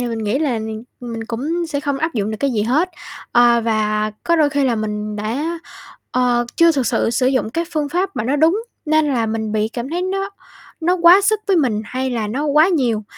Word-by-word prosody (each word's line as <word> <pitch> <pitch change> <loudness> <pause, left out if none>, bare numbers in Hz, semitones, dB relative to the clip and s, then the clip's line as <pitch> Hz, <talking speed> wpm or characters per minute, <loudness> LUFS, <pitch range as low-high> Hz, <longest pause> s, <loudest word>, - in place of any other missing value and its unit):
thì 245 - -1
mình 230 -1 -3
nghĩ 220 +3 -1
là 280 -7 0
mình 220 +1 -6 0.2
mình 230 -2 -6
cũng 295 +10 -3
sẽ 285 -3 -3
không 285 -1 -2
áp 320 +3 -2
dụng 210 -2 -1
được 215 - -3
cái 280 - +1
gì 215 -3 0
hết. 295 - +1 0.4
Ờ, 240 -1 +5
và 215 -1 0
có 340 - +3
đôi 300 -3 +3
khi 285 -1 +1
là 250 -3 +2
mình 210 -1 -3
đã, 275 +11 -3 0.5
ờ, 245 -1 +2
chưa 335 0 +5
thực 270 -5 0
sự - - +1
sử 250 +2 +1
dụng 255 -4 +1
cái 335 +7 -1
phương 300 -2 -1
pháp 360 +2 -2
mà 235 - -1
nó 265 +5 +1
đúng, 330 +9 +3 0.2
nên 310 0 +3
là 230 -3 0
mình 220 -1 -3
bị 215 0 0
cảm 240 +3 -6
thấy 350 +2 -2
nó 390 +1 -2 0.5
nó 350 +3 +2
quá 345 +2 +7
sức 425 +1 +1
với 390 - +4
mình 240 -9 +1
hay 260 +4 -3
là 225 -4 -2
nó 270 +8 -2
quá 300 +3 +4
nhiều, 245 - 0
255 Hz, 235 wpm, -19 LUFS, 225-320 Hz, 0.5 s, quá